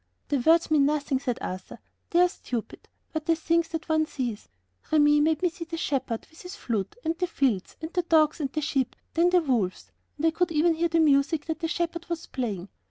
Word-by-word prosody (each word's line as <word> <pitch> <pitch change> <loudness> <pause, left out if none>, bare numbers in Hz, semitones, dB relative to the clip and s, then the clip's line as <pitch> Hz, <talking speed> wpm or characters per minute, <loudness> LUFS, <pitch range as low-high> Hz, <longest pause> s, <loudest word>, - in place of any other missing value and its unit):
"The 285 - +1
words 325 +5 +4
mean 285 -2 +5
nothing," 290 -2 0
said 255 -3 -2
Arthur; 185 0 -6 0.3
"they 345 - +4
are 360 - +6
stupid, 245 - -6 0.2
but 315 -1 -3
the 330 - +4
things 335 +1 +1
that 325 -1 -5
one 315 -1 +2
sees! 240 -8 -4 0.4
Remi 295 -1 +5
made 315 +2 +1
me 355 - +4
see 335 +1 -8
the 330 0 -5
shepherd 265 -7 -2
with 320 - -15
his 360 +2 -8
flute, 220 - -3
and 325 +1 0
the 360 - +1
fields, 255 - 0
and 320 - -5
the 355 - +2
dogs, 320 -2 +3
and 275 -3 -2
the 305 - -2
sheep, 275 -4 -1 0.2
then 340 +2 +4
the 360 0 +4
wolves, 230 -10 -1 0.3
and 300 - -1
I 325 - +5
could 340 +1 0
even 325 +2 +3
hear 335 +1 +1
the 330 +1 +2
music 295 0 +3
that 320 -1 -3
the 325 - -1
shepherd 340 0 -2
was 340 -1 -3
playing. 205 -8 -4
315 Hz, 225 wpm, -27 LUFS, 270-335 Hz, 0.4 s, are